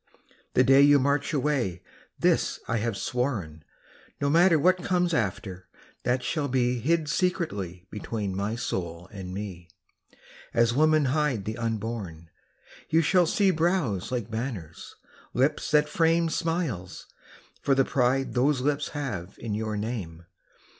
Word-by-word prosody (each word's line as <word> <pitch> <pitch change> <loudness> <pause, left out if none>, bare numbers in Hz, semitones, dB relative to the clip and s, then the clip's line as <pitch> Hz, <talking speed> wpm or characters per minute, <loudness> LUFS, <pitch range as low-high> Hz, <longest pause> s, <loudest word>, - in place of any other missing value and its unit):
The 125 - +6
day 135 +2 +6
you 145 0 +7
march 140 +2 +1
away 130 - -1 0.3
this - - +1
I 115 - 0
have 110 -2 -2
sworn, 110 - -2 0.6
No 140 0 +1
matter 170 +1 +5
what 180 +4 +3
comes 180 -1 +1
after, 95 - -2 0.3
that 125 0 0
shall 150 +2 -1
be 125 -2 +1
Hid 160 +5 +1
secretly 100 - -2
between 105 -2 -4
my 100 +3 -2
soul 85 -6 -4
and 95 -3 -7
me 90 -3 -7 0.9
As 115 0 +3
women 155 +2 +4
hide 145 -10 0
the 110 - -3
unborn 110 -8 -4 0.6
You 165 +1 +3
shall 180 +1 +4
see 195 +3 +3
brows 160 - 0
like 120 -3 -3
banners, 110 - -5 0.4
lips 135 +4 +1
that 150 0 +4
frame 165 +1 +2
Smiles, 160 - -3 0.6
for 135 - +2
the 135 0 +3
pride 130 +1 +1
those 130 +2 +2
lips 145 +2 0
have 100 -10 -4
in 110 -3 -4
your 110 0 -2
name. 100 -7 -5
125 Hz, 140 wpm, -27 LUFS, 100-150 Hz, 0.9 s, you